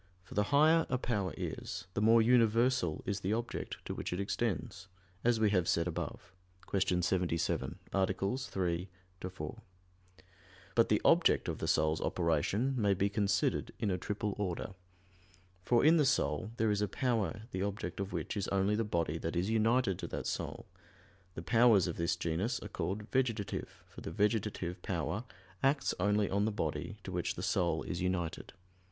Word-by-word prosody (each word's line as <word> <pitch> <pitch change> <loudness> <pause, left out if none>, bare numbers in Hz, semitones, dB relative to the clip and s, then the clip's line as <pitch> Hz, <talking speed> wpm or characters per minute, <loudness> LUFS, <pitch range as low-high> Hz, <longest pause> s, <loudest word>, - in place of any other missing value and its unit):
For 95 - -12
the 105 0 +2
higher 155 +3 +5
a 130 - +1
power 105 -7 -1
is, - - -5
the 105 - -1
more 115 +1 +6
universal 115 -5 +3
is 100 0 -1
the 100 +2 -1
object 115 +1 -3
to - - -3
which - - -4
it 90 - -2
extends, 100 -4 -2 0.4
as 120 -1 +3
we 110 -2 +3
have 90 -4 +2
said 85 +1 +2
above 90 +1 -5 0.3
(Q. 90 -2 +1
77, 85 -2 0 0.2
A. 95 -1 +3 0.3
3, 90 -7 -2 0.3
ad 95 - -4
4). 75 -4 -6 1.1
But - - +4
the - - +3
object - - +4
of - - -3
the - - -2
soul's 80 0 +2
operation 90 - +1
may 100 -2 +3
be 100 +2 +1
considered 100 -1 0
in 105 -3 0
a 90 - 0
triple 105 +2 -2
order. 95 -1 -3 0.9
For 120 +7 +3
in 165 +2 +7
the 150 - +4
soul 105 - +1
there 110 -1 +2
is 105 0 0
a 105 - +1
power 110 -3 -1
the 95 - -3
object 100 -3 -3
of 100 0 -3
which - - -3
is 100 -2 -2
only 100 +1 +1
the 110 +2 +1
body 85 -6 -1
that 80 +2 -3
is 90 +5 0
united 115 -3 +2
to - - -4
that - - -5
soul; - - -4 0.7
the 80 - -6
powers 115 -2 +5
of 85 - -3
this 85 0 +1
genus 85 +9 -1
are 105 - -7
called 95 +3 -3
"vegetative" 115 -6 -1
for - - -12
the - - -5
vegetative 100 -2 -1
power 90 +5 -2 0.4
acts 140 +1 +2
only 105 +2 +2
on 100 +1 +1
the 110 - +1
body 105 +1 -3
to 95 - -6
which 90 0 -1
the 90 - -5
soul 85 -3 +1
is 90 -2 -4
united. 90 -3 -2
100 Hz, 180 wpm, -33 LUFS, 90-110 Hz, 1.1 s, in